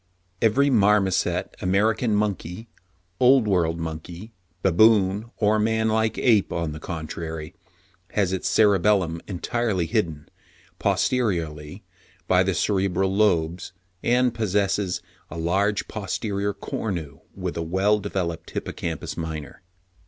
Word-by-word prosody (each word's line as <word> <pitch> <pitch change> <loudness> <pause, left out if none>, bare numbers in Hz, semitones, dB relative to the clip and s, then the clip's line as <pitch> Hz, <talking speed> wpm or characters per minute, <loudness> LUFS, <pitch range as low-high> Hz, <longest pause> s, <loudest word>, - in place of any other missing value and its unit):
Every 135 +6 +3
marmoset, 100 -4 +2
American 105 +4 +2
monkey, 105 0 -2 0.5
Old 125 -2 +5
World 85 -4 +1
monkey, 85 +6 -7 0.3
baboon 100 +2 +4
or 110 0 +2
manlike 110 0 +1
ape, 110 -6 +3
on 85 -2 -2
the 75 - -7
contrary, 80 0 -6 0.6
has 95 -3 +1
its 95 - -1
cerebellum 100 -5 +3
entirely 100 0 -1
hidden, 80 -8 -2 0.5
posteriorly, 85 -12 -1 0.4
by 90 0 +4
the 95 -1 +1
cerebral 95 -1 +1
lobes, 90 -4 +1 0.3
and 125 0 +2
possesses 100 -4 0 0.3
a - - -7
large 100 +5 0
posterior 100 0 -2
cornu 85 -8 -4 0.2
with 90 -2 -4
a 85 - -2
well 95 +6 +2
developed 95 -5 -3
hippocampus - - -4
minor." 80 -3 -6
95 Hz, 110 wpm, -24 LUFS, 85-110 Hz, 0.6 s, Old